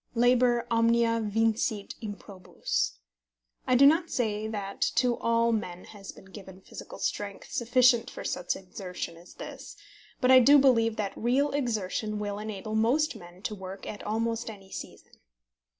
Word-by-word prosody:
Labor 240 Hz, 0 st, +3 dB
omnia 230 Hz, 0 st, +3 dB
vincit 220 Hz, 0 st, 0 dB
improbus. 200 Hz, -, -3 dB, 0.7 s
I 255 Hz, -, +4 dB
do 275 Hz, +3 st, +7 dB
not 325 Hz, +4 st, +4 dB
say 215 Hz, -3 st, -1 dB
that 200 Hz, -2 st, -5 dB
to 240 Hz, 0 st, +3 dB
all 230 Hz, 0 st, +2 dB
men 180 Hz, -5 st, -3 dB
has 200 Hz, -2 st, -10 dB
been -, -, -16 dB
given 190 Hz, -1 st, -12 dB
physical -, -, -10 dB
strength 200 Hz, -1 st, -4 dB
sufficient 245 Hz, -1 st, +3 dB
for -, -, -8 dB
such 180 Hz, -1 st, -2 dB
exertion 180 Hz, -2 st, -7 dB
as 170 Hz, +2 st, -16 dB
this, -, -, -9 dB, 0.4 s
but 255 Hz, -, +3 dB
I 260 Hz, -, +9 dB
do 280 Hz, +4 st, +7 dB
believe 230 Hz, -5 st, +4 dB
that 205 Hz, -2 st, -3 dB
real 265 Hz, +5 st, +1 dB
exertion 220 Hz, -5 st, -2 dB
will 205 Hz, -1 st, -3 dB
enable 215 Hz, 0 st, -6 dB
most 245 Hz, +8 st, +2 dB
men 175 Hz, +2 st, -13 dB
to 215 Hz, -, -3 dB
work 190 Hz, -1 st, -8 dB
at 205 Hz, -, -7 dB
almost 230 Hz, +2 st, -2 dB
any 195 Hz, -3 st, -12 dB
season. -, -, -10 dB
220 Hz, 150 wpm, -28 LUFS, 200-240 Hz, 0.7 s, I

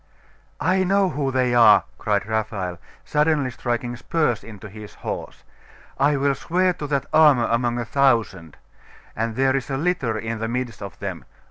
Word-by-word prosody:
'I 185 Hz, +4 st, +2 dB
know 195 Hz, 0 st, +2 dB
who 140 Hz, -5 st, -2 dB
they 130 Hz, -2 st, +1 dB
are!' 115 Hz, -3 st, +7 dB, 0.2 s
cried 105 Hz, -2 st, 0 dB
Raphael, 105 Hz, -5 st, -3 dB, 0.3 s
suddenly 150 Hz, -3 st, +1 dB
striking 120 Hz, 0 st, -3 dB
spurs 120 Hz, -3 st, -1 dB
into 110 Hz, -1 st, -10 dB
his 105 Hz, +1 st, -11 dB
horse. -, -, -6 dB, 0.6 s
'I 145 Hz, +2 st, +3 dB
will 140 Hz, 0 st, +2 dB
swear 180 Hz, +6 st, 0 dB
to 150 Hz, -, -6 dB
that 140 Hz, -2 st, -1 dB
armour 150 Hz, -7 st, +6 dB
among 120 Hz, +1 st, 0 dB
a 120 Hz, -, -2 dB
thousand. 115 Hz, -, +1 dB, 0.6 s
And 115 Hz, 0 st, -2 dB
there 135 Hz, +1 st, +2 dB
is 135 Hz, -1 st, -3 dB
a 135 Hz, -, -1 dB
litter 140 Hz, -8 st, -1 dB
in 115 Hz, +1 st, -4 dB
the 115 Hz, -, -2 dB
midst 120 Hz, 0 st, -4 dB
of 100 Hz, -, -8 dB
them. -, -, -6 dB
125 Hz, 165 wpm, -22 LUFS, 110-145 Hz, 0.6 s, are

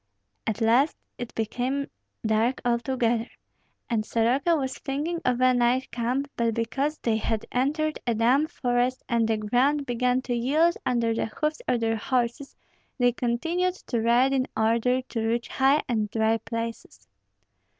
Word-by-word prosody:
At 220 Hz, +1 st, -2 dB
last 240 Hz, +7 st, +3 dB, 0.2 s
it 245 Hz, -1 st, -5 dB
became 250 Hz, +5 st, -1 dB, 0.4 s
dark 220 Hz, +4 st, +1 dB
altogether, 235 Hz, -1 st, 0 dB, 0.6 s
and 225 Hz, -3 st, 0 dB
Soroka 245 Hz, +10 st, +2 dB
was 265 Hz, -4 st, -3 dB
thinking 305 Hz, +5 st, -3 dB
of 250 Hz, -1 st, +1 dB
a 255 Hz, 0 st, +5 dB
night 245 Hz, +2 st, +1 dB
camp; 250 Hz, +4 st, -1 dB
but 230 Hz, -1 st, 0 dB
because 275 Hz, +6 st, -1 dB
they 225 Hz, -2 st, 0 dB
had 220 Hz, 0 st, -2 dB
entered 300 Hz, +5 st, 0 dB
a 235 Hz, -, +2 dB
damp 255 Hz, +7 st, +3 dB
forest 245 Hz, +1 st, 0 dB
and 230 Hz, -2 st, +1 dB
the 220 Hz, -1 st, +1 dB
ground 255 Hz, +7 st, +1 dB
began 250 Hz, +1 st, 0 dB
to 245 Hz, -, -2 dB
yield 295 Hz, +8 st, +3 dB
under 235 Hz, -2 st, +1 dB
the 225 Hz, -, -1 dB
hoofs 305 Hz, -, -2 dB
of 240 Hz, -, +1 dB
their 225 Hz, 0 st, +1 dB
horses, 245 Hz, +3 st, -2 dB, 0.4 s
they 245 Hz, -2 st, +4 dB
continued 330 Hz, +11 st, -1 dB
to 235 Hz, -10 st, -3 dB
ride 245 Hz, +4 st, +3 dB
in 260 Hz, -1 st, +1 dB
order 235 Hz, +3 st, +2 dB
to 235 Hz, -2 st, -4 dB
reach 230 Hz, +1 st, -1 dB
high 270 Hz, +3 st, +3 dB
and 215 Hz, -4 st, 0 dB
dry 220 Hz, +1 st, +2 dB
places. 230 Hz, -, -6 dB
245 Hz, 155 wpm, -26 LUFS, 230-270 Hz, 0.6 s, a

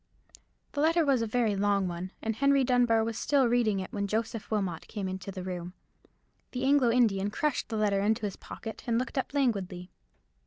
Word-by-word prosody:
The 285 Hz, -, -2 dB
letter 325 Hz, +1 st, +3 dB
was 270 Hz, -4 st, +3 dB
a 230 Hz, -, 0 dB
very 220 Hz, -2 st, +1 dB
long 200 Hz, -1 st, +1 dB
one, 175 Hz, +1 st, -5 dB
and 225 Hz, -1 st, -1 dB
Henry 275 Hz, +2 st, +3 dB
Dunbar 245 Hz, -3 st, +3 dB
was 225 Hz, 0 st, -3 dB
still 275 Hz, -3 st, +3 dB
reading 230 Hz, -4 st, +2 dB
it 185 Hz, -, -6 dB
when 200 Hz, -1 st, -1 dB
Joseph 220 Hz, +1 st, -2 dB
Wilmot 190 Hz, -7 st, -2 dB
came 205 Hz, -3 st, -4 dB
into 185 Hz, +1 st, -5 dB
the 185 Hz, -1 st, -6 dB
room. 180 Hz, -1 st, -5 dB, 0.8 s
The 250 Hz, 0 st, -3 dB
Anglo 270 Hz, -2 st, +4 dB
Indian 215 Hz, -5 st, +2 dB
crushed 295 Hz, +5 st, -1 dB
the 225 Hz, -, -2 dB
letter 205 Hz, -2 st, +2 dB
into 215 Hz, +2 st, +1 dB
his 200 Hz, -, -3 dB
pocket, 220 Hz, -1 st, -8 dB
and 230 Hz, -1 st, +2 dB
looked 255 Hz, +2 st, -1 dB
up -, -, -3 dB
languidly. 195 Hz, -10 st, -1 dB
220 Hz, 195 wpm, -29 LUFS, 195-250 Hz, 0.8 s, Anglo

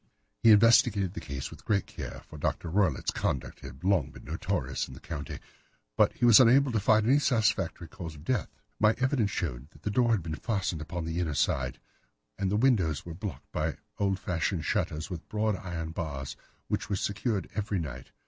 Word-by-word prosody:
"He 115 Hz, -, +6 dB
investigated 105 Hz, -3 st, +5 dB
the -, -, -5 dB
case 70 Hz, -5 st, -5 dB
with -, -, -12 dB
great 100 Hz, -3 st, +1 dB
care, -, -, -8 dB
for 75 Hz, -, -10 dB
Dr. 85 Hz, +3 st, -2 dB
Roylott's 90 Hz, -7 st, +2 dB
conduct 65 Hz, -, -2 dB
had 70 Hz, -, -11 dB
long 95 Hz, -7 st, +2 dB
been -, -, -13 dB
notorious -, -, -2 dB
in 65 Hz, -, -10 dB
the -, -, -11 dB
county, 70 Hz, 0 st, -6 dB, 0.6 s
but -, -, +4 dB
he -, -, 0 dB
was 120 Hz, -1 st, +9 dB
unable 130 Hz, +2 st, +6 dB
to 115 Hz, -, +1 dB
find 110 Hz, +2 st, +4 dB
any 135 Hz, +5 st, +5 dB
satisfactory 105 Hz, -, +1 dB
cause 80 Hz, -1 st, -8 dB
of 75 Hz, -, -12 dB
death. 120 Hz, +5 st, 0 dB, 0.3 s
My 110 Hz, 0 st, +4 dB
evidence 130 Hz, -5 st, +1 dB
showed 70 Hz, -9 st, -3 dB
that -, -, -19 dB
the 105 Hz, -, -1 dB
door 120 Hz, +2 st, +3 dB
had 110 Hz, -7 st, +2 dB
been 80 Hz, -1 st, -4 dB
fastened 95 Hz, -3 st, -2 dB
upon 85 Hz, +2 st, -4 dB
the 80 Hz, +1 st, -2 dB
inner 80 Hz, -5 st, -1 dB
side, 65 Hz, -2 st, 0 dB, 0.6 s
and 95 Hz, -1 st, +1 dB
the 105 Hz, -, +1 dB
windows 100 Hz, -, +2 dB
were 85 Hz, -, -6 dB
blocked 95 Hz, +3 st, -7 dB
by 75 Hz, 0 st, -1 dB, 0.2 s
old 100 Hz, -2 st, +1 dB
fashioned 90 Hz, -2 st, -1 dB
shutters 80 Hz, +5 st, -1 dB
with 85 Hz, -2 st, -7 dB
broad 110 Hz, -1 st, +1 dB
iron 80 Hz, -3 st, -5 dB
bars, 75 Hz, -5 st, -4 dB, 0.3 s
which -, -, -2 dB
were 100 Hz, -, +1 dB
secured 105 Hz, +2 st, -1 dB
every 105 Hz, -1 st, -1 dB
night. 65 Hz, -7 st, -5 dB
95 Hz, 195 wpm, -29 LUFS, 80-110 Hz, 0.6 s, was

